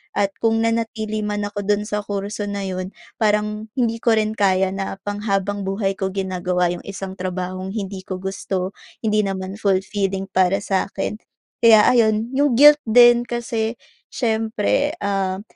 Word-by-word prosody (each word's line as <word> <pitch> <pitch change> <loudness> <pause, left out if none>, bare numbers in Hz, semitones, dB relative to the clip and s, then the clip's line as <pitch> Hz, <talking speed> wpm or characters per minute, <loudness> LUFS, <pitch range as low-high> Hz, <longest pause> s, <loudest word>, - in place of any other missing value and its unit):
At 200 -1 +1
kung 225 0 +2
nanatili 225 -1 -1
man 210 -1 -2
ako 205 0 -4
dun 210 0 +2
sa 210 0 -2
kurso 205 +1 -4
na 200 -1 -3
'yon 185 0 -5 0.2
parang 210 0 0
hindi 230 -3 0
ko 230 -1 +3
rin 215 0 -1
kaya 190 -1 +3
na 195 0 -4
pang 205 0 -4
habang 200 0 -1
buhay 195 0 -1
ko 190 - 0
ginagawa 180 -2 0
'yong 175 - -6
isang 195 -1 -6
trabahong 185 +1 -4
hindi 195 -3 -5
ko 185 0 -5
gusto, 190 -1 -3 0.3
hindi 215 -1 +2
naman 195 0 -3
fullfilling 195 -1 -1
para 190 +1 +2
sa 190 -2 0
akin, 200 +2 -4 0.5
kaya 220 -2 +8
ayun. 225 -1 +2
'Yong 285 -3 +3
guilt 295 +3 +8
din, 240 +1 +6
kasi 230 -1 -2 0.4
siyempre, 225 +4 0
ah, 195 -1 -1
205 Hz, 160 wpm, -21 LUFS, 190-220 Hz, 0.5 s, kaya